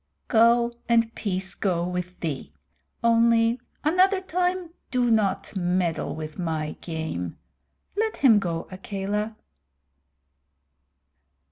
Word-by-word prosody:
"Go, 235 +1 +5 0.2
and 230 -1 +3
peace 190 -2 -2
go 175 -3 0
with 180 0 -4
thee. 140 - -3 0.5
Only, 230 +1 +4 0.2
another 370 +5 +4
time 360 -1 -1 0.2
do 245 -2 +2
not 215 -2 +1
meddle 180 -3 0
with 155 +2 -7
my 160 -3 -2
game. 160 - -4 0.6
Let 440 +1 0
him 235 -7 +6
go, 170 -4 -3
Akela." 200 +3 -3
210 Hz, 100 wpm, -25 LUFS, 175-235 Hz, 0.6 s, him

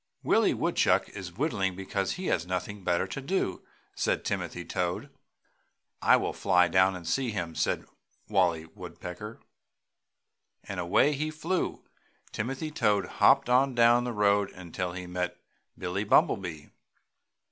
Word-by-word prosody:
"Willie - - +3
Woodchuck - - +2
is 95 -3 -8
whittling 100 - 0
because 95 0 -2
he 185 - -6
has 85 - 0
nothing 95 +2 -4
better 85 -1 +1
to 135 - -6
do!" 140 - -1 0.3
said - - -1
Timothy 90 -1 -3
Toad. 90 -1 -2 0.9
"I - - +6
will - - -2
fly 90 -2 +3
down 95 +2 +3
and 85 -2 -8
see 125 +8 0
him!" 90 -6 -3
said - - -1 0.4
Wallie 90 -6 +2
Woodpecker, 90 +4 -9 1.2
and 100 -2 -6
away 90 +12 +3
he 155 +2 -2
flew. 165 +4 -2 0.5
Timothy 135 +8 -3
Toad 105 -9 +2 0.2
hopped 135 -1 +6
on 130 +1 +3
down 120 +1 +5
the 125 - -2
road 100 -2 +2
until 90 0 -5
he 90 0 -6
met 90 0 -3 0.4
Billie 90 +3 -2
Bumblebee. 80 -6 +2
95 Hz, 135 wpm, -28 LUFS, 90-120 Hz, 1.2 s, I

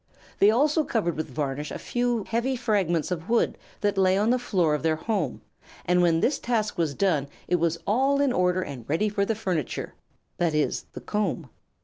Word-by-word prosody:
They 200 - +7
also 295 +7 +3
covered 205 - -1
with 155 - -3
varnish 145 +1 -3
a - - -5
few 240 -2 -1
heavy 235 +5 -1
fragments 195 -10 0
of 170 +1 -4
wood 235 0 +2 0.3
that 205 -1 +1
lay 190 0 +4
on 215 +3 +2
the 250 - +2
floor 180 -10 +1
of 150 - -1
their 160 -1 +2
home, 195 +2 -2 0.4
and 180 0 +3
when 165 -2 +3
this 275 - +1
task 220 -3 -1
was 160 -5 -1
done 160 -7 +1 0.2
it 180 - +2
was 170 0 0
all 270 +6 +2
in 280 -3 +2
order 180 -1 +2
and 135 -7 -7
ready 205 +8 +1
for 200 -1 0
the 225 - -1
furniture, 180 - -3 0.5
that 170 -3 +1
is, 150 -1 0
the - - -7
comb. 180 - -2
190 Hz, 200 wpm, -26 LUFS, 165-225 Hz, 0.5 s, They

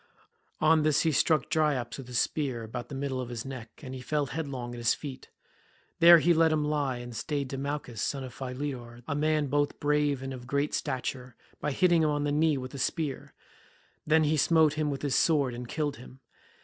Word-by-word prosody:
On 155 +1 +4
this 150 -1 +3
he 160 - +2
struck 155 -1 +2
Dryops 145 -6 0
with 130 - -8
his 125 -1 -3
spear, 130 -6 -1
about 120 +2 -6
the 140 - -6
middle 135 -1 -2
of 125 - -6
his 115 -2 -5
neck, 125 -4 -7
and 130 -1 -7
he 130 - -6
fell 150 +3 0
headlong 135 -5 -5
at 120 - -7
his 115 -1 +2
feet. 140 -4 -8 0.7
There 170 +1 +10
he 170 +1 +4
let 165 0 +4
him 155 -1 +1
lie 145 -4 0
and 120 -1 -8
stayed 140 +3 -2
Demouchus 135 -5 -4
son 140 -2 -2
of 130 -2 -8
Philetor, 125 -2 -6
a 145 - -1
man 155 0 +1
both 145 +1 0
brave 145 -2 +1
and 135 0 -4
of 125 -1 -9
great 140 +3 0
stature, 125 -2 -3 0.2
by 150 - -1
hitting 175 +2 +3
him 155 - +3
on 145 -1 0
the 145 - 0
knee 155 0 +2
with 130 +1 -6
a 140 - -6
spear; 145 0 -3 0.7
then 155 +1 +4
he 155 +1 +2
smote 160 0 +4
him 155 -1 -1
with 140 0 -4
his 140 -2 0
sword 140 -6 +3
and 120 0 -6
killed 145 -3 -2
him. 130 +2 -14
140 Hz, 215 wpm, -29 LUFS, 125-150 Hz, 0.7 s, There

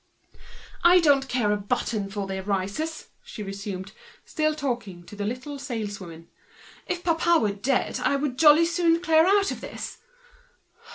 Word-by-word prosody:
"I 350 +1 +7
don't 280 -5 +3
care 235 -5 +1
a 210 - +1
button 205 -1 -2
for 200 0 -4
their 190 0 -4
rises!" 200 +12 -3 0.3
resumed 195 -2 -6
the - - -18
latter, - - -27 0.3
still 310 0 0
talking 240 -11 -4
to 205 - -12
the 205 0 -4
little 260 +5 -5
saleswoman. 205 - -6 0.6
"If 355 -1 -3
papa 335 0 +3
were 210 -2 +1
dead, 250 +6 -1
I 280 - +1
would 275 -2 -2
jolly 315 +1 +7
soon 335 -1 +2
clear 320 -1 +4
out 395 0 +3
of - - -6
this! - - -7
250 Hz, 160 wpm, -25 LUFS, 200-320 Hz, 0.6 s, I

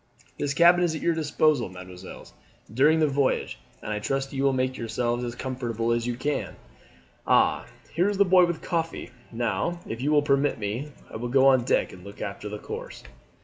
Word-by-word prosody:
This 140 -1 -1
cabin 175 +2 +6
is 165 -2 +1
at - - -5
your 170 - +2
disposal, 155 -5 +1
mesdemoiselles, 90 0 -11 0.4
during 150 +6 +4
the 155 - +4
voyage, 140 -1 0 0.2
and 105 - -3
I 105 - -2
trust 135 +5 -2
you 135 - -2
will 140 - +4
make 130 0 -1
yourselves 120 +1 -2
as 120 -1 -4
comfortable 120 -3 -2
as 120 0 0
you 120 - -1
can. 145 +4 -3 0.7
Ah, - - +3 0.3
here 180 +5 +2
is 205 - -2
the 200 - +5
boy 180 -1 +6
with 170 -2 -4
coffee. 165 -7 -3 0.2
Now, 115 - -1
if 115 +2 -5
you 145 +3 0
will 145 -1 +4
permit 140 0 +2
me, 115 +8 -4 0.2
I - - -5
will 120 +2 -4
go 135 +1 +4
on 130 -3 +5
deck - - +1
and 90 - -13
look 100 +2 -11
after 105 0 -5
her 105 - -5
course." - - -8
130 Hz, 200 wpm, -26 LUFS, 115-150 Hz, 0.7 s, cabin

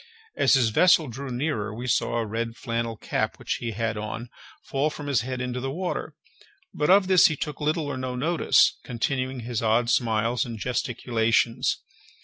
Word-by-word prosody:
As - - +4
his 125 -4 +3
vessel 160 +4 +4
drew 135 +4 -6
nearer, 120 -4 -2
we 120 +3 -6
saw 120 -1 +1
a 115 - 0
red 115 +2 -3
flannel 115 -1 -3
cap - - -2
which - - -3
he 120 - -3
had 115 0 -2
on 110 +3 -5 0.3
fall 140 +3 0
from 150 -1 -8
his 140 -5 +1
head 130 +1 -4
into 125 0 -3
the 135 +1 -3
water; 175 +6 -4 0.6
but 150 - 0
of 195 +1 +6
this 185 -1 +6
he 155 - -1
took 150 +1 -5
little 155 +1 0
or 145 -2 -4
no 130 -1 -4
notice, 160 +7 +3
continuing 130 +1 -2
his 120 -1 -3
odd 115 +1 +2
smiles 115 0 +1
and 120 -4 -6
gesticulations. 115 0 0
125 Hz, 180 wpm, -25 LUFS, 115-140 Hz, 0.6 s, of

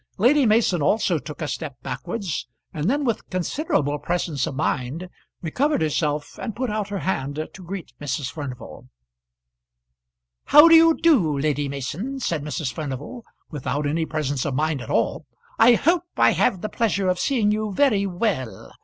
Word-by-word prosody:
Lady 255 +6 +4
Mason 210 -6 +3
also 180 +1 +2
took 150 +2 -7
a - - -2
step 145 -3 -5
backwards, 140 - -4 0.3
and 155 +5 -1
then 285 +2 0
with 230 -3 -2
considerable 175 - -1
presence 160 -3 -1
of - - -5
mind 145 +4 -2 0.4
recovered 260 - +1
herself 150 -1 -1
and 225 -4 -4
put 250 -2 -2
out 210 -1 -2
her 200 - -3
hand 145 -7 -2 0.2
to 185 - -11
greet 180 0 -7
Mrs. 140 -1 -3
Furnival. 140 -6 -8 1.6
"How 295 +3 +8
do 330 - +6
you 325 0 +7
do, 200 - +3
Lady 145 0 0
Mason?" 165 - -4
said 170 - -1
Mrs. 145 -3 -3
Furnival, 145 - -6 0.3
without 145 0 -3
any 160 +2 0
presence 145 -4 -2
of 140 -3 -2
mind 155 -1 0
at - - -9
all. - - 0 0.3
"I 245 - +7
hope 340 +8 +2
I - - +5
have 190 -8 +1
the - - -2
pleasure 200 -4 0
of 180 -1 +1
seeing 230 -7 +2
you 215 0 -1
very 200 -3 +2
well. 175 - -3
170 Hz, 165 wpm, -23 LUFS, 145-225 Hz, 1.6 s, How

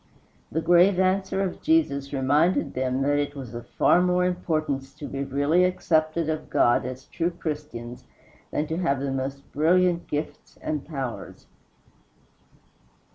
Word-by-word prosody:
The 160 - -1
grave 175 +2 +5
answer 190 +1 +1
of 185 - -4
Jesus 140 - +1
reminded 145 +6 +2
them 130 +1 -1
that 145 +1 +2
it 145 0 -2
was 130 -4 -8
of 120 0 -7
far 175 - +3
more 180 0 +2
importance 155 -6 -2
to 150 - -8
be 140 0 -3
really 145 +6 +2
accepted 165 -3 +1
of 155 -1 -3
God 120 +1 +3
as 130 +1 -7
true 170 0 -1
Christians 150 -8 -6 0.4
than 150 - -1
to 160 +2 -3
have 165 -7 0
the 140 0 -2
most 135 +1 -4
brilliant 175 +3 +2
gifts 150 +1 -5
and 150 -2 -3
powers. 135 -6 -6
150 Hz, 145 wpm, -25 LUFS, 135-175 Hz, 0.4 s, grave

